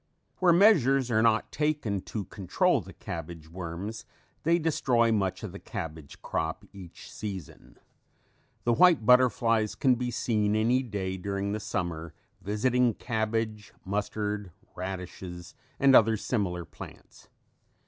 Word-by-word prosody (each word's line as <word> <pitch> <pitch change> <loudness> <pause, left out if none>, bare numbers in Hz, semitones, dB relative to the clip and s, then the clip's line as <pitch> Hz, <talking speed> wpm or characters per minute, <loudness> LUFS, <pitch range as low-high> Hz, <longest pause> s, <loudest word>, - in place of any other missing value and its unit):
Where 180 -2 +5
measures 135 - +5
are 110 -1 +3
not 110 -1 +2
taken 150 -10 -1
to 105 -3 -3
control 95 -4 +1
the - - -12
cabbage 80 -1 -7
worms 95 +6 -6 0.4
they 170 +2 +3
destroy 130 -8 +2
much 95 -4 0
of - - -5
the - - -9
cabbage 80 -3 -7
crop - - -3
each 90 -4 -12
season. 95 -8 -8 0.9
The 120 - +2
white 170 -4 +5
butterflies 115 -3 +4
can 130 -4 +3
be 125 0 -2
seen 105 -3 0
any 120 +4 +3
day 100 -6 -4
during 100 +1 -3
the 105 - -2
summer 85 -5 -4 0.3
visiting 120 +3 +1
cabbage, 110 -2 -2
mustard, 105 0 -2 0.2
radishes 90 -1 -7 0.3
and 135 -1 +6
other 110 0 +6
similar 95 -7 -2
plants. - - -13
105 Hz, 130 wpm, -28 LUFS, 95-125 Hz, 0.9 s, and